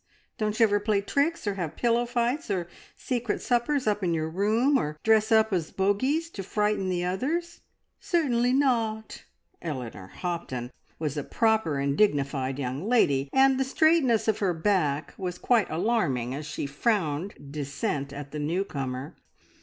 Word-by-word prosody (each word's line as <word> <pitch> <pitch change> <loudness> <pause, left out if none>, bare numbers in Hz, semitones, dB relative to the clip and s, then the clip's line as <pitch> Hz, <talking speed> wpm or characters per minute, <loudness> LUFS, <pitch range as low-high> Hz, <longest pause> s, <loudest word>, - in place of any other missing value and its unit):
Don't 215 0 -1
you - - +6
ever 205 -2 +4
play 205 0 +1
tricks, 285 +10 0
or 205 - 0
have 175 -6 -4
pillow 240 0 +1
fights, 245 +5 -1
or 180 -4 -1 0.3
secret 240 -4 -2
suppers 255 +3 0
up 210 -1 0
in 170 -2 +1
your 160 0 -2
room, 220 - +2
or 150 0 -3
dress 220 +1 +3
up 220 -1 +4
as 170 -4 0
bogeys 260 +13 0
to 200 - -6
frighten 210 0 0
the 180 -1 -1
others?" 310 - -2 0.4
"Certainly 255 -9 +1
not!" 230 -5 0 0.4
Eleanor 125 - -5
Hopton 125 - -4 0.3
was 155 -2 -3
a 145 - -1
proper 220 -9 +1
and 140 0 0
dignified 140 -8 +1
young 135 +2 -3
lady, 140 - +3
and 265 0 +4
the - - +3
straightness 270 -5 +3
of 220 -1 +1
her 185 -4 +1
back 160 -5 0
was 180 -2 -3
quite 235 0 +2
alarming 160 - 0
as 145 +2 -5
she - - -4
frowned 165 - -1 0.2
dissent 140 0 -3
at 140 0 -8
the 150 - -5
new 165 +6 0
comer. 135 -4 -5
200 Hz, 160 wpm, -27 LUFS, 150-235 Hz, 0.4 s, you